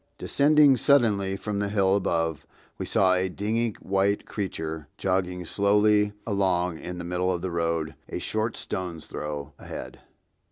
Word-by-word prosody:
Descending 145 -2 +5
suddenly 105 -8 +3
from 105 0 -3
the 100 0 -1
hill 100 -2 +3
above, 80 -5 -1 0.3
we - - -3
saw 95 -1 +3
a 95 0 +1
dingy 110 +4 -1
white 100 +1 +1
creature 80 -7 -4
jogging 90 -1 -1
slowly 105 +2 +3
along 90 -5 0
in 90 0 -6
the 85 - -5
middle 90 +1 0
of 90 -1 -3
the 95 - -2
road 85 -2 -1 0.2
a - - -3
short 110 +2 -2
stone's 90 -4 -5
throw 75 -1 -5
ahead. - - -8
95 Hz, 150 wpm, -26 LUFS, 85-105 Hz, 0.3 s, Descending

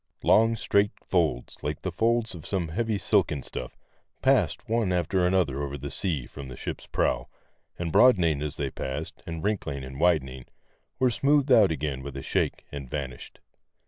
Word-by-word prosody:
Long, 115 +1 +5
straight 100 -2 +2
folds, 80 -9 0
like 75 +1 -4
the 95 - -2
folds 115 +4 +1
in 85 - -8
some 90 -3 -2
heavy 110 +5 -1
silken 75 -6 +1
stuff, 60 - -7 0.5
passed - - +2
one 115 -4 +1
after 90 +1 +1
another 90 -7 +1
over 70 0 -3
the 70 +1 -6
sea 80 -11 -2
from 70 +1 -9
the 65 - -9
ship's - - -6
prow, - - 0 0.5
and 85 -2 -3
broadening 85 - +5
as 75 -1 -4
they - - -2
passed, 70 +4 -5
and 80 -1 -5
wrinkling 90 -10 -2
and 65 +1 -8
widening, 65 -7 +1 0.5
were 130 -1 +3
smoothed 140 +2 +2
out 110 -6 +7
again 75 -3 -2
with 70 0 -7
a 70 - -5
shake, - - -1
and 70 -3 -7
vanished. 65 -4 -6
80 Hz, 175 wpm, -27 LUFS, 70-100 Hz, 0.5 s, out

